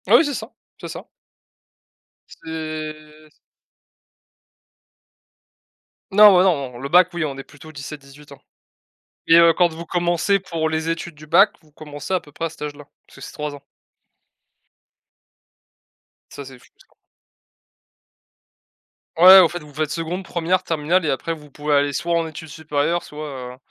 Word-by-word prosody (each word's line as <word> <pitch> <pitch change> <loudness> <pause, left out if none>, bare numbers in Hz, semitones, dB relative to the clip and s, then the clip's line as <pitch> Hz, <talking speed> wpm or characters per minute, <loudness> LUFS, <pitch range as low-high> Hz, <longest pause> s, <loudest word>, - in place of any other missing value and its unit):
Ah - - +6
oui, 330 - +3
c'est 290 - -3
ça, 225 0 -7 0.3
c'est - - -8
ça. - - -9 1.2
C'est 155 -1 -8 2.8
Non, 210 0 +8
bah, 180 - +5
non. 140 -9 0
Le 135 +3 -6
Bac 180 +3 +6
oui 175 -2 -2
on 140 -2 -5
est 135 - -7
plutôt 150 +3 -15
17-18 140 0 -11
ans, 140 - -18 0.9
et 165 - +6
heu, 170 0 +6
quand 175 +1 +3
vous 165 +1 -8
commencez 175 +3 0
pour 165 -4 -3
les 160 +1 -2
études 165 0 -4
du 150 +1 -14
Bac, 195 +7 +5
vous 155 - -26
commencez 150 +3 -7
à 185 - +1
peu 145 - -19
près 165 - -4
à - - -2
cet 160 - -14
âge-là. 145 0 -7 0.2
Parce - - -19
que - - -14
c'est - - -9
3 150 -1 -5
ans. 140 - -12 2.7
Ça 140 - -9
c'est 130 -1 -12
fou, - - -22
ça. - - -23 2.3
Ouais, 185 +3 +10
au 175 -3 +5
fait 175 - -6
vous 150 -3 -15
faites 155 0 -2
2de, 170 +3 -4
1re, 180 +1 -1
terminale 165 +2 0
et - - 0
après 155 +5 -2
vous 150 -3 -13
pouvez 150 +2 -3
aller 145 0 +2
soit 170 +5 -2
en 165 - -1
études 160 0 -10
supérieures, 155 +2 -2
soit, 150 +1 -8 0.3
heu, - - -16
155 Hz, 160 wpm, -21 LUFS, 150-170 Hz, 2.8 s, Ouais